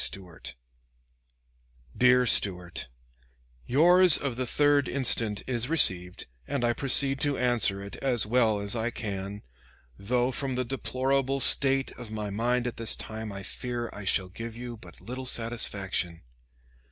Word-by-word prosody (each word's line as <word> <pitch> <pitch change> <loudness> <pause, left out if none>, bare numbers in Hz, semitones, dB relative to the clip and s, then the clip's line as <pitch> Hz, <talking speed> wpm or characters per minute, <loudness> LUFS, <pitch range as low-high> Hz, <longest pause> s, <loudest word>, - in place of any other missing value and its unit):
Stuart: 90 -9 -5 1.4
DEAR 125 0 +4
STUART: 90 - +3 0.8
Yours 175 +5 +7
of 140 -4 -4
the 130 +1 -3
3d 145 +1 +2
instant 115 -6 +1
is 125 0 -3
received, 90 - +3 0.2
and 140 -3 -2
I 120 - +1
proceed 135 +1 0
to 145 -1 -1
answer 115 -6 0
it 100 - -9
as 125 -5 +2
well 110 -2 +1
as 100 +2 -2
I 115 +1 -2
can, 100 -3 -6 0.6
though 125 +5 0
from 135 0 -4
the 130 0 -2
deplorable 135 +1 -2
state 135 0 +3
of 120 -3 -9
my 105 -1 -5
mind 120 +4 -1
at 120 - -5
this 115 -1 -2
time 110 -1 -7
I 95 0 -8
fear 120 +1 -5
I 105 - -9
shall 95 -1 0
give 115 +4 -8
you 120 0 -7
but 90 -6 -16
little 130 +2 -7
satisfaction. 100 -8 -2
120 Hz, 145 wpm, -27 LUFS, 105-130 Hz, 1.4 s, Yours